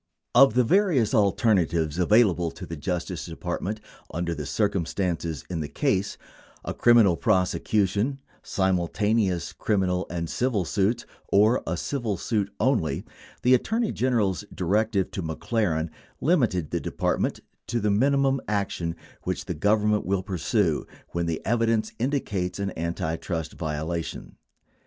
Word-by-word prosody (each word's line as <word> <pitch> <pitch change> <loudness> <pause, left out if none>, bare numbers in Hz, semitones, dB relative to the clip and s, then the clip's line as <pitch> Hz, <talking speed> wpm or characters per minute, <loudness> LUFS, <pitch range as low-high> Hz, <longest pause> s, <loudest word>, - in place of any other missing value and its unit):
5 125 - +7
Of 110 - -7
the 125 - +5
various 150 - +3
alternatives 90 - +2
available 90 -3 +4
to - - -9
the 85 - -6
Justice 90 +2 -3
Department 90 +5 -4 0.3
under 85 +1 -2
the 75 -3 -5
circumstances 85 -2 -1
in 90 -3 -3
the 75 - -3
case 95 +6 0 0.2
— - - -25
a - - -2
criminal 115 -7 +5
prosecution, 105 +4 +1 0.2
simul 95 -3 0
taneous 105 -5 0
criminal 95 -3 0
and 85 -1 -3
civil 115 -2 0
suits, 105 +6 0 0.3
or 110 +5 +4
a - - -1
civil 120 -8 -2
suit, 100 +1 -1
only 85 - +1
6 - - -22 0.2
— - - -23
the 125 - +5
Attorney 225 - +1
General's 110 -7 +1
directive 100 +2 0
to 95 - -4
McLaren 80 -1 -1 0.3
limited 115 - +1
the - - 0
Department - - -1 0.3
to 120 +1 0
the 105 -1 +1
mini 135 +7 +3
mum 135 -1 +2
action 95 -5 -1 0.3
which - - -3
the - - -3
Government 105 +4 +2
will 95 0 0
pursue 95 -2 0 0.2
when 85 0 -2
the 80 -1 -3
evidence 115 -1 +1
indi 140 +4 +1
cates 90 -3 -3
an 100 -1 -2
antitrust 80 -1 -3
violation. 80 +1 -4
100 Hz, 145 wpm, -26 LUFS, 85-115 Hz, 0.3 s, 5